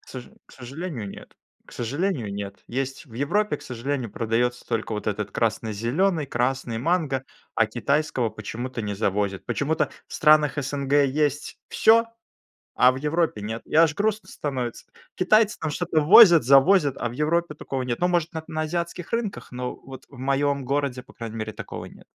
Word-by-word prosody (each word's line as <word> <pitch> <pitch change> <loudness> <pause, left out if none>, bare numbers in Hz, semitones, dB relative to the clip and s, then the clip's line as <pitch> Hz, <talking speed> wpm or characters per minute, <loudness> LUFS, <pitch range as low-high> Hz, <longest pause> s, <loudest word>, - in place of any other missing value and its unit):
К - - -24
соже 130 -2 -9
к - - -19
сожалению, 130 - -6
нет. - - -11 0.3
К - - -16
сожалению, 125 - -2
нет. 100 0 -6
Есть 135 +4 -4
в 115 - -15
Европе, 150 - 0
к - - -16
сожалению, 125 -1 -4
продаётся 120 +2 -1
только 115 -1 -2
вот 105 - -4
этот 105 0 -2
красно-зелёный, 120 - 0
красный 125 -2 -1
манго, 150 -3 0 0.3
а 115 - +3
китайского 125 +1 0
почему-то 115 +3 -6
не 105 -1 -3
завозят. 100 -1 -1
Почему-то 150 +2 0 0.2
в - - -17
странах 150 -2 +4
СНГ 140 0 -3
есть 145 +1 -1
всё, 230 +1 +5 0.7
а 125 - +6
в - - -7
Европе- 150 -4 0
нет. 110 +2 -5
И - - -8
аж 160 -1 +5
грустно 215 +2 -1
становится. 130 -5 -4 0.3
Китайцы 215 +3 +3
там 160 - -2
что-то 165 +1 0
возят, 175 - +8
завозят, 140 +2 +5
а 120 - -1
в - - -8
Европе 155 +3 0
такого 135 -1 -4
нет. 120 -2 -3
Ну, 180 - +3
может, 170 -2 0
на 160 -1 -5
на 155 0 -2
азиатских 170 +3 -4
рынках, 215 - -3
но 125 0 -4
вот 130 0 -12
в 135 - -15
моём 140 +1 0
городе, 135 -1 -1
по - - -17
крайней 115 -1 -7
мере, 110 0 -4
такого - - -7
нет. - - -15
135 Hz, 175 wpm, -24 LUFS, 120-160 Hz, 0.7 s, возят